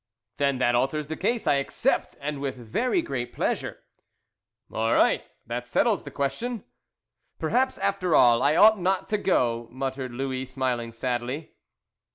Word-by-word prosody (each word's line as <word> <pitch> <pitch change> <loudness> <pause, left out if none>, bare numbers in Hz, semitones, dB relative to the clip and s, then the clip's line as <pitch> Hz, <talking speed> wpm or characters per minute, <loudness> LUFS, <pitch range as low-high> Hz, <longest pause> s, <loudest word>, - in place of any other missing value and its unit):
"Then 140 -2 +1
that 120 -1 +2
alters 140 +5 0
the 160 - -3
case. 230 +6 -1
I 140 - +3
accept, - - -1
and 145 0 -4
with 135 -2 -2
very 230 - -1
great 120 -2 -4
pleasure." - - -2 0.9
"All 115 +1 +1
right. - - +3 0.2
That 120 +1 -4
settles 210 - +1
the - - -6
question." 220 - -3 0.7
"Perhaps, 260 +1 +1
after 185 -4 0
all, 120 -1 +6
I 145 +3 +3
ought 215 +3 +7
not 185 +1 0
to 210 - 0
go," 120 - +1
muttered 130 0 -4
Louis, 130 +1 -3
smiling 125 -3 -2
sadly. 125 +5 -3
135 Hz, 150 wpm, -26 LUFS, 120-185 Hz, 0.9 s, ought